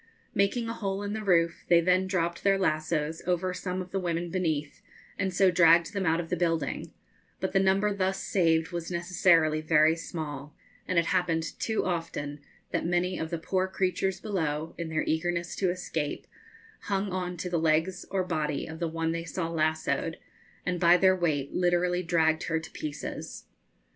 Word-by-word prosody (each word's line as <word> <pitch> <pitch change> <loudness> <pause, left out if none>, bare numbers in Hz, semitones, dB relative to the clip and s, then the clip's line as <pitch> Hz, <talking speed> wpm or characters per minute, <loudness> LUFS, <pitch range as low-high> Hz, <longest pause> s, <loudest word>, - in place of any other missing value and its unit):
Making 225 +4 +1
a 230 - -2
hole 195 -2 -3
in 205 0 -3
the 220 0 -4
roof, 170 -4 +2
they 170 - +6
then 185 +2 +2
dropped 170 -2 -1
their 195 -1 +4
lassoes 155 -2 0
over 180 +1 0
some 185 0 -3
of 180 - -15
the 195 - -1
women 170 -1 -2
beneath, 155 -5 -2 0.4
and 190 - 0
so 185 +1 +4
dragged 170 +1 +5
them 195 -3 -1
out 165 +1 +3
of 165 -1 -5
the - - +2
building; 165 -2 -1 0.5
but - - -2
the 195 - +4
number 195 +2 +3
thus 190 -1 0
saved 165 -3 +1
was 170 -1 -4
necessarily 170 -3 +3
very 155 0 +4
small, 150 -3 -6 0.3
and 185 - 0
it 170 - +4
happened 170 -3 +1 0.2
too 220 -1 0
often 155 -5 -3 0.3
that - - 0
many 175 +2 0
of 160 - -3
the 170 - -2
poor 185 +3 0
creatures 190 0 -1
below, 160 -7 -2
in 170 -1 -5
their 155 0 0
eagerness 170 +1 -1
to 190 - +1
escape, 165 -4 -3 0.6
hung 195 0 -1
on 180 -1 -3
to 175 - -4
the 175 -2 0
legs 160 +3 +1
or 190 -1 0
body 155 -5 -2
of 160 0 -8
the 170 - 0
one 165 0 -1
they 165 0 -3
saw 165 0 -3
lassoed, 155 -1 0 0.5
and 180 -1 -1
by 175 +1 +6
their 185 +1 +5
weight 150 -6 -1
literally 180 0 +2
dragged 165 -2 +2
her 165 -1 0
to 160 0 -10
pieces. 150 -1 -6
170 Hz, 185 wpm, -28 LUFS, 160-185 Hz, 0.6 s, they